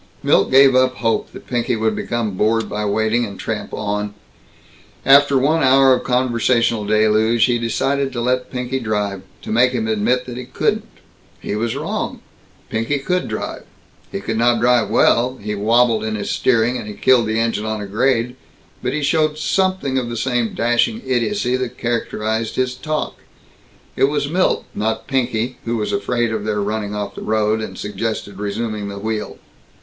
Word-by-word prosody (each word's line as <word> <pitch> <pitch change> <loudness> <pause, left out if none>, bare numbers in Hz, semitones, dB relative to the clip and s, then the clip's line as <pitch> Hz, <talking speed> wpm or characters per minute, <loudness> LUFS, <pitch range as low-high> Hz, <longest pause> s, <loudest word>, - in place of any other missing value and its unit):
Milt - - +3
gave 135 0 +6
up 130 0 +3
hope 115 -2 -1
that - - -12
Pinky 120 -1 -1
would 110 -1 0
become 120 -3 -2
bored 110 +4 +1
by 105 +1 -3
waiting 110 +3 +1
and 100 -4 -6
tramp 110 -1 -4
on. 105 0 -3 0.9
After 140 +1 +6
one 155 +5 +2
hour 135 0 +6
of 125 - 0
conversational 120 -3 +1
deluge, 110 +2 +3
he 120 -2 +1
decided 135 +4 0
to 120 - -2
let 125 +1 0
Pinky 125 +1 -3
drive 105 -4 -2 0.2
to - - -6
make 125 +3 +3
him 110 -3 -1
admit 110 +4 +1
that 125 -1 -7
he 125 - -6
couldn't. 130 - -1 0.5
He - - -4
was 115 +2 -1
wrong. - - -3 0.5
Pinky 115 +6 0
could 180 +6 -1
drive. 110 - -5 0.5
He 100 - -4
could 115 +2 -2
not 120 0 +3
drive 120 -1 +3
well, 125 +3 +3
he 105 +1 -4
wabbled 115 +2 +2
in 110 0 -2
his 100 - -3
steering, 120 0 +2
and 110 - -7
he 105 - -7
killed 120 -1 +3
the 110 +1 0
engine 115 -2 0
on 110 0 -2
a 105 - -5
grade, 120 +4 0 0.5
but 125 - -2
he 150 0 -2
showed 155 +1 +1
something 185 -5 0
of 120 -2 -4
the 120 - -4
same 120 -2 -1
dashing 120 -1 +1
idiocy 130 - 0
that 125 -1 -4
characterized 110 -2 -2
his 130 -1 0
talk. 155 +4 -3 0.8
It - - +4
was 145 0 0
Milt 180 +5 +1
not 110 +1 -2
Pinky, 125 -3 -1
who 120 0 -1
was 105 - -2
afraid 120 +3 0
of 110 -2 -2
their 105 -1 -1
running 105 0 -2
off 100 -1 -4
the - - -9
road, 110 0 +1
and 95 -4 -6
suggested 105 -1 -4
resuming 105 0 -3
the 100 0 -6
wheel. 110 +1 -4
115 Hz, 180 wpm, -19 LUFS, 110-130 Hz, 0.9 s, gave